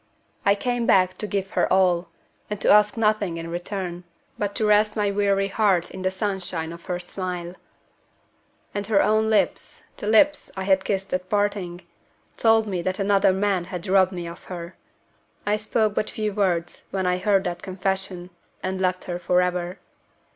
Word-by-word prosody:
I 200 Hz, -, +6 dB
came 245 Hz, +2 st, -1 dB
back 185 Hz, -1 st, +4 dB
to 210 Hz, -, -3 dB
give 195 Hz, -1 st, -2 dB
her -, -, +1 dB
all, 180 Hz, -2 st, +3 dB, 0.4 s
and 210 Hz, -1 st, -3 dB
to -, -, +4 dB
ask 210 Hz, +1 st, +5 dB
nothing 215 Hz, -6 st, +1 dB
in 165 Hz, 0 st, -6 dB
return, 175 Hz, 0 st, -4 dB, 0.3 s
but 205 Hz, -1 st, -3 dB
to 220 Hz, -, 0 dB
rest 210 Hz, 0 st, +4 dB
my 205 Hz, -2 st, +1 dB
weary 200 Hz, -1 st, +1 dB
heart 195 Hz, -4 st, +2 dB
in 190 Hz, -, -7 dB
the 185 Hz, -, +1 dB
sunshine 190 Hz, -4 st, -3 dB
of 170 Hz, -, -12 dB
her 180 Hz, -1 st, -2 dB
smile. 180 Hz, -1 st, -5 dB, 1.2 s
And 205 Hz, -1 st, -3 dB
her 210 Hz, -3 st, +4 dB
own 215 Hz, +1 st, +2 dB
lips 215 Hz, -2 st, 0 dB
the 205 Hz, -, -5 dB
lips 285 Hz, +8 st, +4 dB
I 190 Hz, -, -2 dB
had 190 Hz, 0 st, +2 dB
kissed 195 Hz, -1 st, -2 dB
at 185 Hz, 0 st, -2 dB
parting 200 Hz, -4 st, -1 dB, 0.5 s
told 225 Hz, -1 st, +4 dB
me 190 Hz, -4 st, -2 dB
that 185 Hz, +2 st, -2 dB
another 195 Hz, -1 st, +3 dB
man 190 Hz, -2 st, 0 dB
had 180 Hz, 0 st, -6 dB
robbed 190 Hz, -1 st, +4 dB
me 175 Hz, -2 st, -5 dB
of 170 Hz, -, -10 dB
her. 175 Hz, -1 st, -7 dB, 0.7 s
I 210 Hz, +1 st, +2 dB
spoke 215 Hz, 0 st, 0 dB
but 210 Hz, -, -1 dB
few 215 Hz, -3 st, -2 dB
words 180 Hz, -4 st, -1 dB
when 190 Hz, -1 st, -2 dB
I 180 Hz, 0 st, +1 dB
heard 195 Hz, 0 st, +2 dB
that 175 Hz, -2 st, -4 dB
confession, 190 Hz, -1 st, -3 dB, 0.3 s
and 190 Hz, 0 st, -2 dB
left 185 Hz, -1 st, 0 dB
her 175 Hz, -1 st, -4 dB
forever. 180 Hz, 0 st, 0 dB
190 Hz, 175 wpm, -24 LUFS, 180-205 Hz, 1.2 s, I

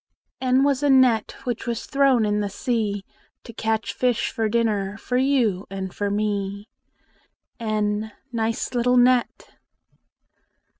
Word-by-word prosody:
N 260 Hz, +1 st, +3 dB
was 280 Hz, -1 st, +2 dB
a 290 Hz, -, +2 dB
net 255 Hz, -5 st, +4 dB
Which 245 Hz, -2 st, -4 dB
was 235 Hz, -1 st, -3 dB
thrown 270 Hz, -5 st, +3 dB
in 210 Hz, 0 st, 0 dB
the 205 Hz, -1 st, -1 dB
sea 205 Hz, -2 st, -2 dB, 0.4 s
To 230 Hz, -, -11 dB
catch 220 Hz, -1 st, -1 dB
fish 245 Hz, -3 st, 0 dB
for 220 Hz, -1 st, -1 dB
dinner 210 Hz, -3 st, 0 dB
For 250 Hz, -, -4 dB
you 250 Hz, -8 st, +1 dB
and 190 Hz, -1 st, -5 dB
for 205 Hz, 0 st, -2 dB
me. 200 Hz, 0 st, -2 dB, 0.9 s
n 215 Hz, -1 st, -1 dB, 0.2 s
Nice 225 Hz, +1 st, -2 dB
little 250 Hz, +1 st, +2 dB
net! 245 Hz, 0 st, +2 dB
225 Hz, 135 wpm, -23 LUFS, 205-250 Hz, 0.9 s, net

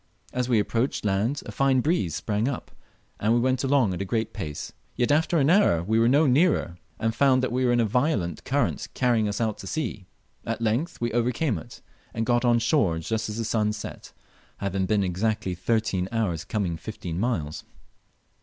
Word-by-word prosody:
As 125 Hz, 0 st, -1 dB
we 120 Hz, -, +4 dB
approached 115 Hz, +4 st, 0 dB
land 105 Hz, +8 st, 0 dB
a -, -, -6 dB
fine 135 Hz, -1 st, +2 dB
breeze 125 Hz, -, 0 dB
sprang 105 Hz, +2 st, -1 dB
up, 140 Hz, -3 st, -4 dB, 0.5 s
and 110 Hz, +3 st, +2 dB
we -, -, +3 dB
went 130 Hz, +2 st, +1 dB
along 135 Hz, -7 st, +3 dB
at 90 Hz, -, -4 dB
a -, -, 0 dB
great 110 Hz, +3 st, -2 dB
pace; 75 Hz, -8 st, -6 dB, 0.2 s
yet 120 Hz, +2 st, +1 dB
after 160 Hz, +3 st, +2 dB
an 140 Hz, -3 st, +3 dB
hour 180 Hz, -, +4 dB
we 110 Hz, +5 st, +1 dB
were 115 Hz, -, +4 dB
no 145 Hz, +6 st, +4 dB
nearer, 135 Hz, -, +2 dB, 0.2 s
and 115 Hz, 0 st, 0 dB
found 130 Hz, +1 st, +3 dB
we 130 Hz, +1 st, -1 dB
were 120 Hz, -, +3 dB
in 120 Hz, -, +3 dB
a 115 Hz, -, +3 dB
violent 110 Hz, -, 0 dB
current 140 Hz, -2 st, 0 dB
carrying 120 Hz, -4 st, +2 dB
us 100 Hz, -1 st, -3 dB
out 110 Hz, -3 st, -1 dB
to 95 Hz, -, -8 dB
sea. 110 Hz, -8 st, -4 dB, 0.4 s
At -, -, -3 dB
length 115 Hz, +10 st, -1 dB
we 120 Hz, 0 st, 0 dB
overcame 120 Hz, -, 0 dB
it, -, -, -12 dB, 0.3 s
and 115 Hz, 0 st, -1 dB
got 120 Hz, 0 st, +2 dB
on 120 Hz, -1 st, +4 dB
shore 115 Hz, -, +2 dB
just 110 Hz, +7 st, -2 dB
as 105 Hz, -, -5 dB
the 115 Hz, -, -2 dB
sun 105 Hz, -1 st, +1 dB
set, 105 Hz, -, -8 dB, 0.5 s
having 95 Hz, -1 st, -1 dB
been 105 Hz, 0 st, +2 dB
exactly 95 Hz, +1 st, -1 dB
thirteen 95 Hz, 0 st, 0 dB
hours 100 Hz, -9 st, -1 dB
coming 95 Hz, -6 st, -2 dB
fifteen 90 Hz, -4 st, -6 dB
miles. 85 Hz, -10 st, -2 dB
115 Hz, 195 wpm, -26 LUFS, 100-125 Hz, 0.5 s, we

